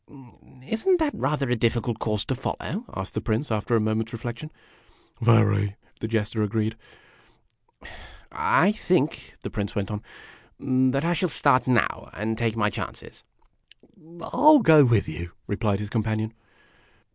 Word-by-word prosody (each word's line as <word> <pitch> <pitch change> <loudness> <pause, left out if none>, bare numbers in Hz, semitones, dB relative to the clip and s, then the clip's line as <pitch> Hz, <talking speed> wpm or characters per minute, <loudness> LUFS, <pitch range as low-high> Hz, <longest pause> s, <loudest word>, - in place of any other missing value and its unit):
" 130 - -21
Is 225 - -4
n't 370 -1 +6
that 315 -3 0
rather 145 -2 -1
a - - +3
difficult 115 0 0
course 105 -2 -1
to - - -1
follow? 170 - -4
" - - -13
asked 95 0 -5
the 110 - -2
Prince, 115 +5 -2
after 110 +2 0
a - - +4
moment's 110 +1 -1
reflection. 120 +6 -6 0.4
" - - -33
Very," 105 -3 +3 0.2
the 110 - -3
Jester 110 0 -1
agreed. 110 +1 -1 0.9
" - - -42 0.6
I 190 +5 +3
think," 180 -8 -1
the - - -6
Prince 100 -1 -4
went 100 0 -2
on, 105 0 -4 0.9
"that 135 +4 0
I 175 - +2
shall 175 +1 0
start 140 -4 +2
now, 120 -5 +1
and 110 +3 -2
take 115 -1 -1
my 105 -1 +1
chances." - - -8 0.7
"I 170 +1 -12
'11 300 -1 +7
go 155 -5 +8
with 115 -4 +2
you," 85 +2 -7
replied 105 -1 0
his 105 +1 -6
companion. 110 -1 -1
115 Hz, 165 wpm, -25 LUFS, 105-145 Hz, 0.9 s, go